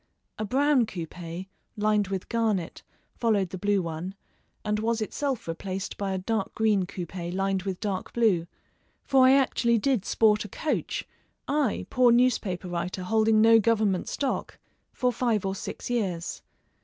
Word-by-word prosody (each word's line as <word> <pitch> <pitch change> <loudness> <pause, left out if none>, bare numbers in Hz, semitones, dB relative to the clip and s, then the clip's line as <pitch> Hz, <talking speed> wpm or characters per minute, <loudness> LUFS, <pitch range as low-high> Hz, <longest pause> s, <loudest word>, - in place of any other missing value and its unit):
A 215 - -1
brown 270 +1 +3
coupé, 175 -1 -6 0.3
lined 210 -1 +2
with 190 -1 -4
garnet, 220 -7 -1 0.4
followed 205 -6 +1
the 185 - -4
blue 205 -1 +1
one, 170 +3 -5 0.5
and 210 0 0
was 230 +1 0
itself 260 +2 -2
replaced 185 +3 -4
by 200 -1 -3
a 190 - -1
dark 200 +2 -2
green 210 -5 +2
coupé 175 -2 -6
lined 195 +1 0
with 185 -1 -4
dark 195 -3 -3
blue, 200 -8 +2 0.6
for 265 -2 +5
I 260 - +7
actually 245 -3 +3
did 250 -2 +1
sport 215 +1 +3
a 210 - -9
coach 310 - -2 0.4
I, 285 -5 0
poor 250 -2 +5
newspaper 230 -7 +2
writer 175 +1 -3
holding 220 +2 +3
no 225 0 +7
Government 215 -4 +1
stock 275 -2 -2 0.3
for 250 -1 0
five 230 -4 0
or 190 - 0
six 195 - -6
years. 190 -9 -2
210 Hz, 155 wpm, -27 LUFS, 185-230 Hz, 0.6 s, I